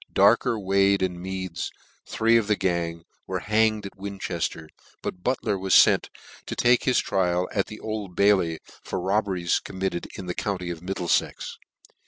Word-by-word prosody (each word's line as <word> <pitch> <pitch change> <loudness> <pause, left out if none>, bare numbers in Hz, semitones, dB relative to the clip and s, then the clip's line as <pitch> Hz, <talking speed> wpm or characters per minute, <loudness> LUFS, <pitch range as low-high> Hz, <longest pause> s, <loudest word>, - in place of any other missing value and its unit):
Darker, 120 -3 +4
Wade, 100 0 +3
and 90 -1 -2
Meads, 95 -2 -4 0.4
three 115 +1 +2
of 115 -3 +3
the 105 - +3
gang, 85 -3 -1 0.2
were - - -2
hanged 110 -1 +2
at 100 - -8
Winchefter: 95 -5 -4 0.3
but 90 - -4
Butler 115 -6 0
was 95 0 +2
fent - - +4 0.4
to - - -4
take 120 0 +3
his 130 - +3
trial 90 -1 +1
at 100 - 0
the 110 - -9
Old 105 -4 -5
Bailey, 95 -5 +3 0.3
for - - -3
robberies 95 -2 +1
committed 95 -2 -4
in 95 - -6
the 90 - -3
county 90 -3 -3
of 85 -2 -7
Middleiex. 90 -1 -1
95 Hz, 160 wpm, -25 LUFS, 90-105 Hz, 0.4 s, Darker